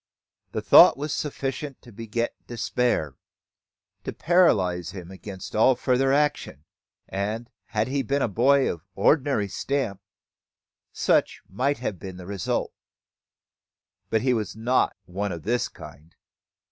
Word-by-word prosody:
The - - -3
thought - - +8
was 150 +2 -3
sufficient 140 -1 -4
to 120 - -14
beget 115 +2 -3
despair, 115 - -1 0.9
to - - -4
paralyse 95 - +2
him 90 -2 -9
against 95 0 -9
all 120 +4 +5
further 130 +2 +1
action; 145 - 0 0.4
and, 105 +5 -3
had 110 0 -1
he 140 +1 0
been 140 +3 0
a - - +2
boy 135 +6 +3
of 85 - -11
the 80 - -38
ordinary 135 -1 +2
stamp, 105 -1 -2 0.9
such - - +1
might 130 +9 0
have 110 -7 -4
been 95 -2 -8
the 90 - -9
result. 100 -2 -2 1.4
But 110 0 +1
he 130 -1 +3
was 110 -3 -2
not 120 +4 +1
one 100 +3 -3
of 85 -3 -6
this 120 +4 0
kind. 80 +4 -13
115 Hz, 135 wpm, -25 LUFS, 95-135 Hz, 1.4 s, thought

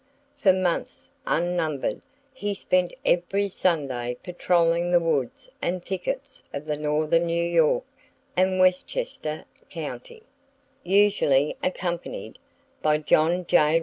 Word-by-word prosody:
For 190 - +6
months 185 -2 -2 0.2
unnumbered, 165 -4 0 0.3
he 205 -6 -3
spent 185 -2 +1
every 195 +3 +1
Sunday 135 -10 -1
patroling 175 -1 +1
the 175 0 +5
woods 165 - -2
and 180 0 -2
thickets 265 +9 -4
of 140 +2 -6
northern 155 +2 +1
New 170 0 0
York 170 -2 +3 0.5
and 185 +1 +2
Westchester 185 - 0 0.2
county, 470 -2 -7 0.6
usually 185 -8 +3
accompanied 185 - -4 0.4
by 150 0 +3
John 165 +4 +2
J. 165 -2 +4
175 Hz, 105 wpm, -25 LUFS, 155-185 Hz, 0.6 s, For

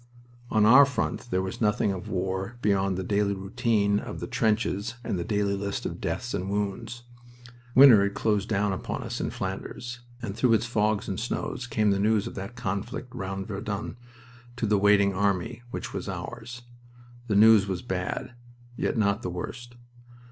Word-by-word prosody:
On 110 -1 +3
our 130 +6 +9
front 130 -3 -2
there 95 -2 0
was 95 +4 -5
nothing 105 -1 +2
of 95 +2 -6
war 95 +4 -2
beyond 95 -2 +2
the 95 - -2
daily 100 0 +1
routine 100 +1 +1
of - - -7
the - - -4
trenches 110 +1 0
and 95 - -2
the - - -1
daily 100 +1 0
list 100 0 -3
of - - -5
deaths 120 - -3
and 95 -1 -2
wounds. 105 +4 -3 0.7
Winter 130 -6 +9
had 100 0 0
closed 105 0 0
down 105 -2 +1
upon 95 - -4
us - - -4
in - - -1
Flanders, 120 0 -5 0.2
and 110 -4 -5
through 120 0 +3
its 115 +1 +2
fogs 105 -3 0
and 95 - -3
snows 125 +1 -3
came 105 -4 +2
the 100 - +1
news 105 0 +2
of - - -6
that 100 +5 -7
conflict 120 +4 -4
round 95 0 -4
Verdun 100 +1 -4 0.6
to 125 - -1
the 105 -1 +2
waiting 100 -1 +4
army, 95 +2 0
which - - -6
was - - -4
ours. 120 0 -7 0.6
The 105 - 0
news 105 -1 +7
was 95 -2 -3
bad, 95 +6 -3 0.4
yet - - -1
not 100 0 +2
the 90 - -3
worst. 120 +7 -7
105 Hz, 175 wpm, -27 LUFS, 100-115 Hz, 0.7 s, our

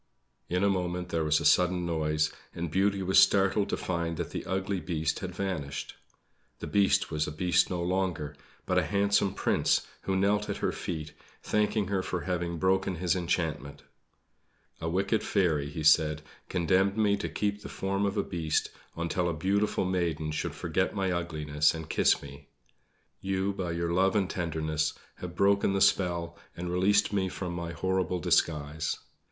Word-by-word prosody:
In 90 +2 +1
a - - +4
moment 90 -2 -1
there 80 -2 0
was 75 0 +3
a - - -4
sudden 90 0 +3
noise, 75 -2 0 0.2
and 85 -2 -4
Beauty 95 +2 +1
was 95 +1 +5
startled 100 +1 +4
to - - -1
find 85 -2 -2
that 85 - -4
the - - -4
ugly 95 +1 -1
Beast 80 -3 -2
had 90 -1 -6
vanished. 80 -9 -4 0.6
The - - -6
Beast 100 -1 +2
was 75 0 0
a - - -3
beast 90 +3 +2
no 90 -2 -2
longer, 90 -5 -1 0.3
but - - +2
a - - +1
handsome 100 -1 +2
Prince, - - +1 0.2
who 95 - -1
knelt 105 +2 +1
at - - -2
her - - 0
feet, 80 -3 -5 0.3
thanking 105 0 +1
her 100 -2 +1
for 90 -1 -3
having 85 -2 -2
broken 95 +1 +1
his 85 +1 0
enchantment. 80 -5 -2 1.0
"A 80 - -2
wicked 100 +5 +1
fairy," 80 -8 +1
he 75 +2 -5
said, 75 0 +4 0.3
"condemned 95 +3 +2
me 105 -2 +3
to - - -3
keep 105 0 -2
the - - -8
form 100 +1 -2
of 100 +2 -3
a 100 - +2
beast 80 -3 -1 0.2
until 85 +1 -1
a 85 - -2
beautiful 100 +5 +1
maiden 85 -4 -1
should 75 - -3
forget - - -1
my 95 -1 0
ugliness 75 -3 0
and 80 -1 -6
kiss - - +3
me. 70 0 -11 0.7
You, 95 +1 -1
by 90 -3 -3
your 85 0 -1
love 95 +3 +3
and 100 -3 +2
tenderness, 80 -3 -1 0.2
have 90 -1 -7
broken 100 +1 +3
the 100 - +1
spell 85 -3 +1 0.2
and 90 0 -4
released 100 +3 +3
me 95 -2 +1
from 90 -1 -5
my 85 -1 -4
horrible 95 0 -1
disguise. 80 -3 0
90 Hz, 175 wpm, -29 LUFS, 80-95 Hz, 1.0 s, was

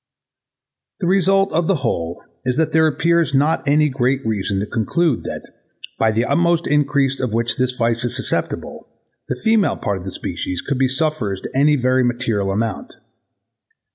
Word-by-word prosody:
The - - 0
result 195 +1 +2
of 165 0 +1
the 195 - +3
whole 85 -6 -2 0.2
is 125 +1 -1
that 160 -1 +1
there 160 0 +4
appears 165 0 +1
not 145 +2 +1
any 150 +2 +4
great 130 -1 0
reason 100 -3 -1
to 100 - -1
conclude 130 +7 0
that, - - -6 0.5
by 110 - +3
the 115 +3 0
utmost 170 +4 +2
increase 140 -2 +1
of 125 -4 -2
which 115 +1 0
this 130 0 +1
vice 120 -1 0
is 120 - -2
susceptible, - - -2 0.4
the - - -1
female 220 - +2
part 100 -2 -2
of - - -10
the 95 - -6
species 90 0 -4
could 135 -2 -3
be 135 - +3
sufferers 130 - -1
to - - -7
any 145 +2 +4
very 130 -1 +2
material 120 -5 -1
amount. 115 - -3
130 Hz, 170 wpm, -19 LUFS, 115-160 Hz, 0.5 s, there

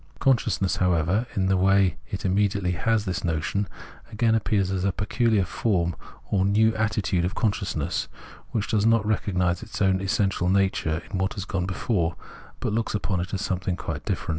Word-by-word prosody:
Conscious 125 -5 +2
ness, 95 - +1
however, 90 +5 +1
in 95 - +1
the 95 0 +3
way 95 0 +3
it 100 - -5
immediately 95 -1 +1
has 110 +5 +1
this 95 0 -2
notion, 85 +4 -1 0.4
again 110 +1 +2
appears 100 -3 +1
as 95 -1 -1
a 100 - +2
peculiar 110 0 +1
form 85 -7 0 0.4
or 95 -2 +3
new 110 +3 +3
attitude 105 -5 0
of 90 - -2
consciousness, 105 -4 -1 0.4
which 110 -2 -2
does 105 -2 +2
not 115 -2 +3
recognise 90 -4 0
its - - -7
own 95 -1 +2
essential 95 -1 +1
nature 95 -4 +1
in 95 - -2
what 95 +1 -1
has 100 -2 -4
gone 90 -3 -2
before, 95 -3 -1 0.5
but - - -1
looks 110 -1 -1
upon 95 -3 -1
it 85 - -4
as 100 - -2
something 90 -1 -1
quite - - -5
different. - - -3
95 Hz, 180 wpm, -25 LUFS, 90-105 Hz, 0.5 s, the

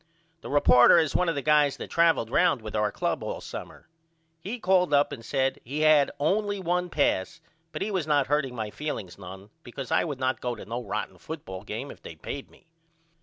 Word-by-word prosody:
The - - -8
reporter 135 -1 +6
is 160 -3 +2
one 180 -1 +2
of 165 - -1
the 140 - -3
guys 150 -2 +3
that - - -8
travled 165 -9 +3
round 175 -10 +3
with 110 0 -6
our 105 -1 +1
club - - -2
all - - -4
summer. - - -9 0.5
He 200 +9 -5
called 180 -6 +3
up 145 0 +3
and 115 - -7
said 135 +2 0
he 145 +6 -4
hadn't 155 -2 +4
only 205 +7 +1
the 190 - -7
one 180 +1 0
pass 140 - 0 0.3
but - - -3
he 210 - -3
was 185 -6 -1
not 145 -3 +3
hurting 135 -2 0
my 110 -2 -4
feelings 100 - -5
none 95 +2 -10
because 130 -1 -8
I - - +3
would 145 -5 -4
not 130 -2 -1
go 125 -1 -2
to - - -10
no 120 +3 -4
rotten 105 0 -4
football 95 - -7
game 110 +7 -6
if - - -14
they 80 - -10
payed 135 - -7
me. - - -22
140 Hz, 220 wpm, -27 LUFS, 115-165 Hz, 0.5 s, reporter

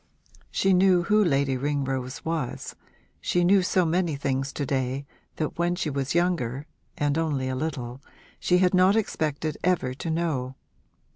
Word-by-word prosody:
She 195 0 +2
knew 180 -1 +4
who 210 +4 +4
Lady 140 -5 +1
Ringrose 135 -2 -2
was; 160 -6 -3 0.5
she 175 - +1
knew 190 +2 +5
so 180 0 +2
many 170 -1 +1
things 135 0 -1
to 145 - -2
day 135 +1 -1 0.3
that 155 +1 -3
when 175 +1 +1
she 165 -4 -2
was 140 +2 -2
younger 150 -7 0 0.3
and 145 +1 +1
only 145 -5 -1
a 130 - -2
little 130 -4 -4 0.4
she 180 - +3
had 180 0 +3
not 185 +2 +5
expected 155 -7 -1
ever 175 -8 +1
to 150 +5 -5
know. 155 -6 -1
155 Hz, 155 wpm, -26 LUFS, 135-175 Hz, 0.5 s, knew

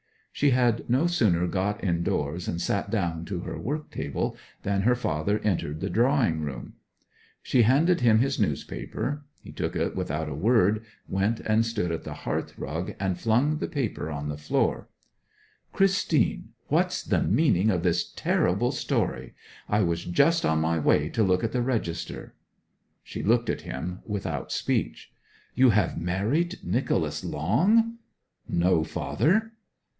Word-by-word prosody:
She 145 - +2
had 120 -3 +2
no 130 +7 +3
sooner 105 - +2
got 100 +4 -1
indoors 85 -2 -1
and 85 - -2
sat 100 +3 -1
down 85 -7 -1
to 90 -2 -4
her - - -6
work 150 +4 -4
table - - -3 0.3
than 100 0 0
her 120 +5 +3
father 100 -2 -1
entered 80 -7 -1
the 95 - -2
drawing 115 - +2
room. 70 -5 -6 0.7
She 125 - +3
handed 150 +8 +3
him 115 -3 +5
his 135 +4 +1
newspaper; 125 - -2 0.2
he - - -10
took - - -3
it - - -1
without 75 +2 -2
a - - -4
word, 105 - +2 0.2
went 100 +4 0
and 110 +1 +2
stood 115 -7 -2
on 80 - -3
the - - -7
hearthrug, 80 +6 -4
and 95 -2 -1
flung 125 +7 +2
the - - -2
paper 125 - -3
on 75 -1 -4
the 75 - -4
floor. 75 +1 -1 0.8
'Christine, 195 -7 +1 0.2
what's - - +1
the - - +1
meaning 95 +5 +3
of 90 -5 0
this 85 -1 +1
terrible - - +1
story? - - -2 0.3
I 105 +1 +2
was 85 -1 -1
just 160 - +3
on 80 0 +2
my 80 +1 +1
way 75 0 +2
to 115 - -1
look 90 -2 +2
at 115 - 0
the 125 - 0
register.' 115 -10 -3 0.7
She - - -6
looked 115 +1 +2
at - - -4
him 85 +9 -5
without 105 -3 -3
speech. - - -2 0.4
'You 130 +1 +5
have 95 -5 +1
married 115 - 0
Nicholas - - -1
Long?' 230 +3 +2 0.5
'No, 85 -1 +2
father.' 185 - 0
105 Hz, 150 wpm, -26 LUFS, 85-125 Hz, 0.8 s, him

